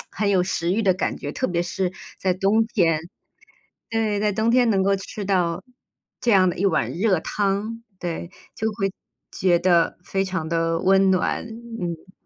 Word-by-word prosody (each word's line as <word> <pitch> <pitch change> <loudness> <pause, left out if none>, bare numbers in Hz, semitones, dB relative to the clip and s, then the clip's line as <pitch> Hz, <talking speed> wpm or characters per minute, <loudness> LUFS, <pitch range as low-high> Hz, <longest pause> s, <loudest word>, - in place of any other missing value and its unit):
很 205 0 -1
有 185 -2 +3
食 175 -1 -1
欲 220 +3 +1
的 190 -2 +4
感 185 - -2
觉， - - -5
特 255 - -1
别 175 -1 0
是 180 +1 -2 0.3
在 185 -1 +1
冬 205 +4 +2
天。 170 -8 +2 0.9
对， 220 -2 0
在 210 -1 +1
冬 220 +3 +1
天 245 0 +4
能 195 -2 +2
够 195 0 +3
吃 195 +1 -6
到 180 -2 0 0.6
这 240 - +1
样 185 -2 +5
的 - - -7
一 195 - +2
碗 195 - +1
热 185 -2 +1
汤。 210 +4 -2 0.2
对， 170 0 -4 0.2
就 220 - -1
会 195 -2 -2 0.4
觉 180 -2 +2
得 170 -2 +3
非 195 +1 -1
常 185 -4 -3
的 165 0 0
温 195 +1 +4
暖， 185 - +1 0.4
嗯。 175 +1 -5
190 Hz, 190 characters per minute, -23 LUFS, 175-205 Hz, 0.9 s, 样